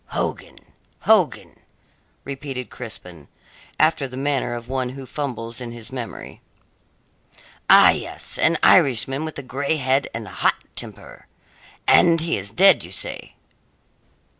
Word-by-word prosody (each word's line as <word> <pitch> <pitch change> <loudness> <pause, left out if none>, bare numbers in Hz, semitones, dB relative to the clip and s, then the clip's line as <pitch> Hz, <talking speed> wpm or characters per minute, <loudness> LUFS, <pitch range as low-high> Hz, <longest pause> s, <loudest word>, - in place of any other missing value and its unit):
"Hogan - - -4 0.4
Hogan?" - - +2 0.6
repeated 135 -2 -6
Crispin, 90 - -9 0.5
after 155 -3 +3
the 130 0 -9
manner 135 -3 -1
of 120 0 -8
one 130 -1 -2
who 135 +1 -9
fumbles 125 -4 -5
in 120 -1 -6
his 115 +1 -10
memory. 125 -3 -8 1.3
"Ah, - - +9
yes - - -4
an - - +3
Irishman 135 +3 +4
with 155 - -6
a 140 - -6
grey 140 +4 -1
head 135 0 +1
and 115 -1 -6
a - - -10
hot - - +1 0.2
temper. - - -9 0.6
And 165 -1 +5
he 165 +1 -1
is 100 0 -4
dead, 190 - +5
you 85 - -7
say?" 95 - -4
130 Hz, 135 wpm, -22 LUFS, 115-140 Hz, 1.3 s, Ah